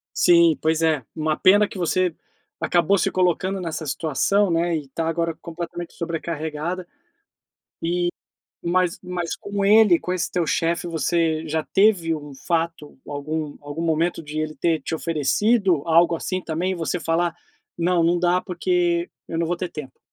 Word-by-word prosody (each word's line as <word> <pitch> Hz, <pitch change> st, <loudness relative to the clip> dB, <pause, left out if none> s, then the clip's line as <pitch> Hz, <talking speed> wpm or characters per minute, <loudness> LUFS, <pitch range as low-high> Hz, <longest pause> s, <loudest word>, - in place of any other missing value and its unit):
Sim, 170 Hz, -2 st, +5 dB
pois 160 Hz, 0 st, +1 dB
é, 155 Hz, -5 st, +2 dB
uma 155 Hz, -1 st, 0 dB
pena 205 Hz, +2 st, +5 dB
que -, -, -9 dB
você 180 Hz, 0 st, +1 dB, 0.5 s
acabou 175 Hz, +3 st, +2 dB
se -, -, +1 dB
colocando 185 Hz, +1 st, 0 dB
nessa 165 Hz, -2 st, -4 dB
situação, 170 Hz, +7 st, +1 dB
né, 170 Hz, +1 st, +1 dB
e 150 Hz, -3 st, -4 dB
tá 160 Hz, +4 st, -3 dB
agora 165 Hz, 0 st, 0 dB
completamente 170 Hz, 0 st, -6 dB
sobrecarregada. 165 Hz, +1 st, -4 dB, 1.0 s
Eh, 175 Hz, +1 st, +1 dB, 0.5 s
mas 175 Hz, 0 st, +1 dB
mas 180 Hz, -2 st, -3 dB
com 200 Hz, 0 st, -3 dB
ele, 210 Hz, -4 st, +6 dB
com 180 Hz, -, -4 dB
esse 185 Hz, -, -1 dB
teu 175 Hz, -2 st, 0 dB
chefe, 165 Hz, +4 st, 0 dB
você 165 Hz, -1 st, 0 dB
já 160 Hz, 0 st, -1 dB
teve 190 Hz, -5 st, +3 dB
um 145 Hz, -2 st, -8 dB
fato, 165 Hz, -2 st, -3 dB
algum 150 Hz, +1 st, -4 dB
algum 145 Hz, +3 st, -5 dB
momento 165 Hz, +1 st, 0 dB
de 150 Hz, 0 st, -6 dB
ele 155 Hz, 0 st, -3 dB
ter 165 Hz, -2 st, 0 dB
te 140 Hz, -, -4 dB
oferecido 170 Hz, -, +1 dB
algo 170 Hz, +1 st, +4 dB
assim 185 Hz, +3 st, -3 dB
também, 175 Hz, +4 st, -1 dB
você 170 Hz, 0 st, -2 dB
falar: 165 Hz, +1 st, 0 dB, 0.4 s
"Não, 175 Hz, 0 st, +2 dB
não 170 Hz, +1 st, +3 dB
dá 180 Hz, +1 st, +2 dB
porque 175 Hz, -1 st, 0 dB, 0.2 s
eu 165 Hz, -, -3 dB
não 170 Hz, -, +1 dB
vou 175 Hz, +1 st, -1 dB
ter 180 Hz, 0 st, -3 dB
tempo.". 135 Hz, -4 st, -9 dB
170 Hz, 160 wpm, -23 LUFS, 160-180 Hz, 1.0 s, ele